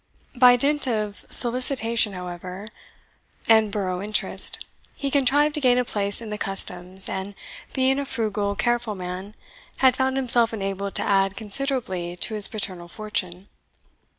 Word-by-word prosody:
By 245 Hz, 0 st, +7 dB
dint 285 Hz, +3 st, +2 dB
of 215 Hz, -4 st, -3 dB
solicitation, 235 Hz, -3 st, +1 dB
however, 180 Hz, +2 st, -8 dB, 0.8 s
and 220 Hz, -2 st, +4 dB
borough 185 Hz, -3 st, -2 dB
interest, 210 Hz, +1 st, +3 dB, 0.3 s
he 275 Hz, -1 st, -3 dB
contrived 290 Hz, +2 st, +3 dB
to 300 Hz, -, -1 dB
gain 250 Hz, -2 st, +4 dB
a 250 Hz, -, +1 dB
place 205 Hz, -1 st, 0 dB
in 220 Hz, -2 st, -8 dB
the 210 Hz, -, -5 dB
customs, 190 Hz, -1 st, -3 dB
and, 195 Hz, +1 st, -5 dB, 0.4 s
being 265 Hz, +1 st, +2 dB
a 280 Hz, -, -3 dB
frugal, 210 Hz, -5 st, -2 dB
careful 240 Hz, -1 st, -1 dB
man, 185 Hz, +3 st, -7 dB, 0.4 s
had 260 Hz, -2 st, +4 dB
found 265 Hz, 0 st, 0 dB
himself 240 Hz, -3 st, +2 dB
enabled 195 Hz, -1 st, -4 dB
to -, -, +1 dB
add 195 Hz, -1 st, +1 dB
considerably 210 Hz, -6 st, -3 dB
to 200 Hz, +5 st, -2 dB
his 210 Hz, -2 st, +4 dB
paternal 185 Hz, -5 st, -4 dB
fortune. 195 Hz, -2 st, -4 dB
215 Hz, 145 wpm, -23 LUFS, 195-250 Hz, 0.8 s, By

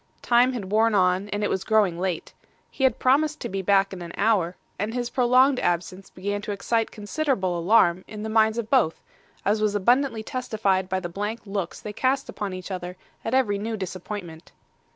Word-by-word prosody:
Time 245 Hz, +2 st, +4 dB
had 200 Hz, -6 st, -5 dB
worn 220 Hz, +1 st, +3 dB
on, 185 Hz, +1 st, +2 dB
and 205 Hz, +1 st, -2 dB
it -, -, +1 dB
was 190 Hz, -, -1 dB
growing 205 Hz, -6 st, +2 dB
late. 180 Hz, -3 st, -3 dB, 0.4 s
He 265 Hz, -, 0 dB
had 255 Hz, -2 st, +2 dB
promised 300 Hz, +4 st, +2 dB
to -, -, -4 dB
be 195 Hz, 0 st, -3 dB
back 195 Hz, 0 st, +3 dB
in 185 Hz, -, -7 dB
an 170 Hz, 0 st, -7 dB
hour; 195 Hz, -5 st, +2 dB, 0.2 s
and 215 Hz, +4 st, -2 dB
his 245 Hz, -1 st, -2 dB
prolonged 255 Hz, +1 st, +4 dB
absence 180 Hz, +2 st, -2 dB
began 205 Hz, +2 st, -4 dB
to 210 Hz, -, -5 dB
excite 225 Hz, +3 st, 0 dB
considerable 210 Hz, -, -1 dB
alarm 175 Hz, 0 st, +3 dB
in 210 Hz, -1 st, -7 dB
the -, -, -3 dB
minds 220 Hz, 0 st, +3 dB
of 230 Hz, -1 st, -4 dB
both, 245 Hz, -, +3 dB, 0.5 s
as 210 Hz, +2 st, +2 dB
was 210 Hz, -1 st, +1 dB
abundantly 240 Hz, +3 st, +2 dB
testified 205 Hz, -7 st, -1 dB
by 190 Hz, +1 st, 0 dB
the 180 Hz, -, -5 dB
blank 205 Hz, +6 st, -4 dB
looks 195 Hz, -4 st, -4 dB
they 210 Hz, -, -7 dB
cast 265 Hz, +4 st, 0 dB
upon 205 Hz, -2 st, -4 dB
each 185 Hz, +1 st, -7 dB
other 180 Hz, -1 st, -5 dB, 0.3 s
at 225 Hz, -, -1 dB
every 210 Hz, -7 st, +2 dB
new 220 Hz, +2 st, -3 dB
disappointment. 185 Hz, -3 st, -7 dB
205 Hz, 195 wpm, -25 LUFS, 185-230 Hz, 0.5 s, Time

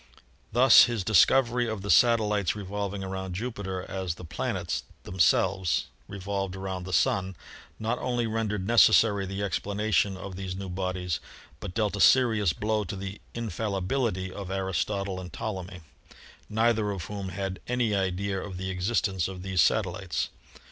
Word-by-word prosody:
Thus 125 Hz, +4 st, +8 dB
his 120 Hz, -5 st, -2 dB
discovery 120 Hz, +4 st, +4 dB
of 110 Hz, -3 st, -4 dB
the 100 Hz, -, 0 dB
satellites 105 Hz, -6 st, +3 dB
revolving 100 Hz, -1 st, -4 dB
around 95 Hz, -1 st, -5 dB
Jupiter 95 Hz, -4 st, -4 dB
as 95 Hz, -3 st, -3 dB
the 90 Hz, -, -10 dB
planets 80 Hz, -5 st, -2 dB, 0.2 s
themselves 95 Hz, -1 st, +2 dB, 0.2 s
revolved 95 Hz, -1 st, -4 dB
around 95 Hz, -1 st, -5 dB
the 95 Hz, -, -6 dB
Sun 95 Hz, +1 st, +1 dB, 0.4 s
not 115 Hz, +3 st, -2 dB
only 120 Hz, -2 st, -1 dB
rendered 110 Hz, -3 st, -2 dB
necessary 105 Hz, -3 st, +5 dB
the 95 Hz, +2 st, -4 dB
explanation 100 Hz, 0 st, 0 dB
of 95 Hz, 0 st, -7 dB
these 95 Hz, -1 st, -5 dB
new 95 Hz, 0 st, -6 dB
bodies, 90 Hz, -2 st, -2 dB, 0.4 s
but 95 Hz, -3 st, -7 dB
dealt 105 Hz, -2 st, 0 dB
a 100 Hz, -, -2 dB
serious 110 Hz, -8 st, +5 dB
blow 105 Hz, +5 st, -1 dB
at 100 Hz, -, -6 dB
the 95 Hz, +1 st, -6 dB
infallibility 105 Hz, -2 st, -2 dB
of 100 Hz, -2 st, -7 dB
Aristotle 95 Hz, 0 st, -2 dB
and 90 Hz, -1 st, -9 dB
Ptolemy, 95 Hz, -3 st, -5 dB, 0.7 s
neither 110 Hz, -1 st, +2 dB
of 95 Hz, -5 st, -4 dB
whom 100 Hz, -2 st, -5 dB
had 95 Hz, +1 st, -4 dB
any 120 Hz, -3 st, +1 dB
idea 95 Hz, 0 st, -1 dB
of 95 Hz, -3 st, -7 dB
the 95 Hz, +1 st, -3 dB
existence 95 Hz, -1 st, 0 dB
of 95 Hz, -1 st, -7 dB
these 95 Hz, -1 st, +2 dB
satellites. 90 Hz, -, 0 dB
100 Hz, 150 wpm, -27 LUFS, 95-110 Hz, 0.7 s, Thus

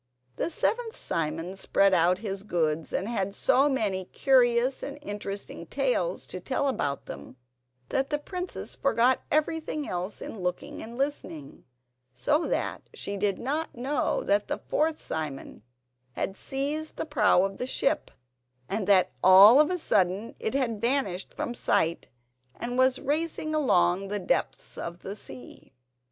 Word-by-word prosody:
The -, -, -1 dB
seventh 460 Hz, +5 st, -1 dB
Simon 165 Hz, +3 st, -2 dB
spread 195 Hz, 0 st, +2 dB
out 180 Hz, +1 st, +4 dB
his 195 Hz, -1 st, -3 dB
goods, 165 Hz, -5 st, -1 dB
and 195 Hz, -, -1 dB
had 200 Hz, -4 st, -2 dB
so 275 Hz, +7 st, +3 dB
many 205 Hz, -8 st, 0 dB
curious 250 Hz, +1 st, +3 dB
and 280 Hz, +1 st, -6 dB
interesting 205 Hz, -2 st, -6 dB
tales -, -, -1 dB
to -, -, -6 dB
tell 280 Hz, -, -1 dB
about 145 Hz, -, -2 dB
them, -, -, -9 dB, 0.5 s
that 270 Hz, 0 st, 0 dB
the 295 Hz, -, +1 dB
princess 360 Hz, +5 st, -5 dB
forgot 250 Hz, -1 st, +3 dB
everything 310 Hz, -1 st, -1 dB
else 180 Hz, +3 st, -3 dB
in 220 Hz, -, -7 dB
looking 180 Hz, -1 st, -4 dB
and 230 Hz, +2 st, -8 dB
listening, 180 Hz, -, -4 dB, 0.5 s
so 300 Hz, -, +1 dB
that -, -, -1 dB
she 200 Hz, -, -4 dB
did 200 Hz, 0 st, 0 dB
not 295 Hz, +6 st, -3 dB
know 260 Hz, +3 st, -1 dB
that 200 Hz, +1 st, +2 dB
the -, -, -1 dB
fourth 310 Hz, +1 st, 0 dB
Simon 150 Hz, -8 st, -5 dB, 0.5 s
had 190 Hz, -, -3 dB
seized 290 Hz, +7 st, -3 dB
the -, -, -3 dB
prow 220 Hz, -, +3 dB
of 195 Hz, 0 st, -2 dB
the 250 Hz, -, -3 dB
ship, 280 Hz, +3 st, 0 dB, 0.6 s
and 200 Hz, -1 st, -2 dB
that 190 Hz, -7 st, +5 dB
all 195 Hz, +7 st, +9 dB
of 305 Hz, -, +5 dB
a 365 Hz, -, 0 dB
sudden 200 Hz, -, +1 dB
it 220 Hz, -, -2 dB
had 230 Hz, -6 st, 0 dB
vanished 235 Hz, -7 st, 0 dB
from 240 Hz, -, -4 dB
sight, 170 Hz, -7 st, 0 dB, 0.5 s
and 245 Hz, +1 st, -4 dB
was 260 Hz, 0 st, +4 dB
racing 310 Hz, +1 st, -1 dB
along 180 Hz, -, +3 dB
in 195 Hz, -, -6 dB
the 205 Hz, +1 st, -2 dB
depths 190 Hz, -, -2 dB
of 170 Hz, +1 st, -6 dB
the 195 Hz, -, -5 dB
sea. 130 Hz, -, -11 dB
225 Hz, 155 wpm, -27 LUFS, 185-280 Hz, 0.6 s, all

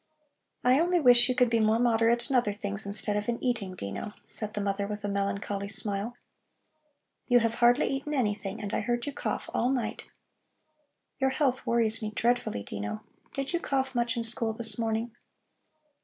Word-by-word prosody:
"I 255 Hz, +3 st, +5 dB
only 350 Hz, +1 st, +3 dB
wish 245 Hz, -3 st, +7 dB
you 255 Hz, -, +1 dB
could 250 Hz, -2 st, +3 dB
be 230 Hz, -, +3 dB
more 220 Hz, 0 st, +3 dB
moderate 235 Hz, 0 st, +2 dB
in 270 Hz, -, -1 dB
other 235 Hz, -5 st, +2 dB
things 200 Hz, 0 st, -4 dB
instead 205 Hz, +1 st, 0 dB
of 210 Hz, +2 st, -2 dB
in 235 Hz, -, 0 dB
eating, 220 Hz, -7 st, -2 dB
Dino," 100 Hz, -, -6 dB
said 215 Hz, -1 st, -2 dB
the -, -, -1 dB
mother 200 Hz, 0 st, -1 dB
with 210 Hz, 0 st, -5 dB
a -, -, -1 dB
melancholy 200 Hz, 0 st, -2 dB
smile. 205 Hz, +3 st, -3 dB, 1.1 s
"You 245 Hz, -, +5 dB
have 230 Hz, 0 st, +1 dB
hardly 240 Hz, +3 st, +5 dB
eaten 275 Hz, +2 st, -3 dB
anything, 210 Hz, -4 st, -1 dB
and 205 Hz, -1 st, -5 dB
I -, -, +1 dB
heard 240 Hz, +2 st, -1 dB
you 285 Hz, -, -4 dB
cough -, -, -3 dB
all 245 Hz, -, +1 dB
night. 260 Hz, -3 st, -2 dB, 1.1 s
Your 265 Hz, -1 st, +3 dB
health 265 Hz, -1 st, 0 dB
worries 230 Hz, -1 st, +1 dB
me 215 Hz, -, -2 dB
dreadfully, 235 Hz, -, 0 dB
Dino. 105 Hz, +1 st, -5 dB, 0.3 s
Did 275 Hz, +4 st, -3 dB
you 345 Hz, -, +1 dB
cough 265 Hz, -4 st, -1 dB
much 240 Hz, -1 st, 0 dB
in 230 Hz, -, -1 dB
school 225 Hz, 0 st, +2 dB
this 225 Hz, +1 st, +1 dB
morning?" 225 Hz, +1 st, -2 dB
230 Hz, 185 wpm, -28 LUFS, 205-245 Hz, 1.1 s, wish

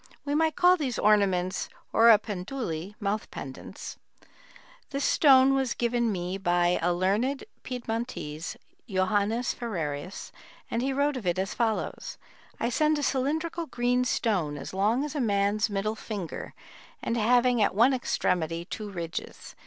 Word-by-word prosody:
We 285 Hz, -, -1 dB
might 315 Hz, 0 st, +2 dB
call 360 Hz, +1 st, +5 dB
these 265 Hz, -8 st, -2 dB
ornaments 195 Hz, -3 st, +2 dB, 0.2 s
oripenduli 210 Hz, -4 st, +2 dB
[mouth 210 Hz, 0 st, -2 dB
pendants]. -, -, -8 dB, 0.9 s
This 275 Hz, 0 st, -2 dB
stone 270 Hz, -2 st, +6 dB
was 265 Hz, -2 st, 0 dB
given 235 Hz, -1 st, +1 dB
me 180 Hz, 0 st, -3 dB
by 175 Hz, -1 st, +2 dB
a 175 Hz, +2 st, +2 dB
learned 205 Hz, +10 st, 0 dB, 0.2 s
Piedmontese, 230 Hz, -8 st, -4 dB, 0.3 s
Johannes 205 Hz, +5 st, +1 dB
Ferrerius, 175 Hz, -7 st, -4 dB, 0.4 s
and 230 Hz, -, 0 dB
he 270 Hz, +2 st, 0 dB
wrote 280 Hz, +1 st, +1 dB
of 215 Hz, -7 st, -5 dB
it 175 Hz, +1 st, +1 dB
as 190 Hz, +1 st, -1 dB
follows: 225 Hz, -2 st, -2 dB, 0.4 s
"I 235 Hz, -, 0 dB
send 305 Hz, +5 st, +2 dB
a 290 Hz, -, -2 dB
cylindrical 315 Hz, +6 st, -1 dB
green 245 Hz, 0 st, +1 dB
stone, 185 Hz, -11 st, 0 dB
as 145 Hz, -, -7 dB
long 215 Hz, +7 st, +2 dB
as 300 Hz, -, -5 dB
a 295 Hz, -, -1 dB
man's 205 Hz, -1 st, +1 dB
middle 205 Hz, +1 st, -1 dB
finger, 205 Hz, -6 st, -6 dB, 0.5 s
and 230 Hz, -, -1 dB
having 240 Hz, +1 st, +3 dB
at 205 Hz, -, +2 dB
one 240 Hz, +6 st, +5 dB
extremity 170 Hz, -9 st, -1 dB
two 210 Hz, +2 st, -6 dB
ridges. 170 Hz, -4 st, -6 dB
220 Hz, 140 wpm, -28 LUFS, 185-255 Hz, 0.9 s, stone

